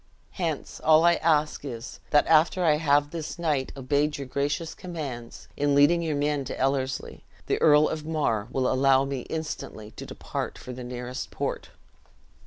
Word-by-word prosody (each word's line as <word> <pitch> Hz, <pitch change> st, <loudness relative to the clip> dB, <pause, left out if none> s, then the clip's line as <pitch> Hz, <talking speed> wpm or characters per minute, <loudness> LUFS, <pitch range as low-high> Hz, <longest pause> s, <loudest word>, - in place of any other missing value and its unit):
Hence, 165 Hz, -6 st, -4 dB
all 160 Hz, +1 st, +6 dB
I 170 Hz, -, +6 dB
ask 155 Hz, -3 st, +1 dB
is, 120 Hz, -4 st, -7 dB
that 145 Hz, -, +4 dB
after 165 Hz, +3 st, +4 dB
I 150 Hz, -2 st, +4 dB
have 145 Hz, -1 st, +2 dB
this 165 Hz, 0 st, -5 dB
night 150 Hz, -6 st, 0 dB
obeyed 145 Hz, +3 st, 0 dB
your 140 Hz, -, -5 dB
gracious 145 Hz, +5 st, -2 dB
commands, 140 Hz, -10 st, -7 dB
in 145 Hz, 0 st, +1 dB
leading 150 Hz, +5 st, +5 dB
your 160 Hz, -3 st, -1 dB
men 145 Hz, 0 st, 0 dB
to -, -, -5 dB
Ellerslie, 135 Hz, 0 st, -1 dB, 0.2 s
the -, -, -1 dB
Earl 150 Hz, 0 st, +6 dB
of 155 Hz, -1 st, -4 dB
Mar 145 Hz, -9 st, -1 dB
will 130 Hz, 0 st, 0 dB
allow 135 Hz, +1 st, +4 dB
me 135 Hz, -1 st, -3 dB
instantly 150 Hz, -9 st, -5 dB
to -, -, -9 dB
depart -, -, -5 dB
for 125 Hz, -, -8 dB
the 125 Hz, 0 st, -7 dB
nearest 125 Hz, +1 st, -5 dB
port." -, -, -4 dB
145 Hz, 170 wpm, -26 LUFS, 130-155 Hz, 0.2 s, all